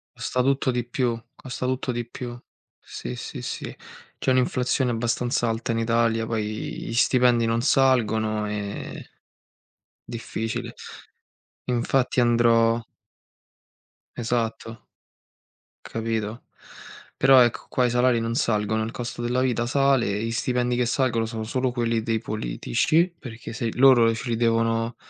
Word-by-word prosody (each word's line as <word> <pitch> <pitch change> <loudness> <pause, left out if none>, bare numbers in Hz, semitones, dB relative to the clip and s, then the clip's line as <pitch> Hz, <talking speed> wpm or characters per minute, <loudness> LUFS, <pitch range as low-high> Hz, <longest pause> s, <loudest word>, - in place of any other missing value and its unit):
Costa 125 - -1
tutto 135 0 +1
di 120 -1 -2
più 120 -1 0 0.2
costa 125 0 -6
tutto 130 0 -1
di 120 0 -3
più. 120 0 -7 0.4
Sì, - - -7
sì, - - -7
sì. - - -5 0.4
C'è - - 0
un'inflazione 125 0 +1
abbastanza 120 +1 0
alta 115 +1 -2
in 115 - -1
Italia, 115 0 +1
poi 115 -1 -1 0.4
gli - - -5
stipendi 125 -1 +3
non 115 +1 +1
salgono 110 -5 +2
e 105 -1 -5 1.0
difficile. 115 -1 -5 0.9
Infatti 125 +1 +1
andrò 115 -1 +3 1.4
Esatto. 115 -1 -3 0.9
Capito. 115 0 -3 0.7
Però 135 -1 +6
ecco, 120 -1 +1
qua 125 - +2
i - - +2
salari 125 0 +3
non 115 0 -2
salgono, 110 -4 +1
il 110 - -4
costo 120 0 -5
della 125 +2 0
vita 120 -2 +1
sale, 130 -6 +2
gli 115 - -2
stipendi 125 +1 0
che 125 0 +1
salgono 120 -2 +1
sono 110 0 -5
solo 125 +3 -1
quelli 115 -2 0
dei 115 -1 0
politici, 110 - 0
perché 120 -3 -9
se 120 +1 -3
i 115 - -2
loro 125 -3 +6
ce 115 +3 -5
li 115 - +1
devono 115 0 +1
120 Hz, 135 wpm, -24 LUFS, 115-125 Hz, 1.4 s, Però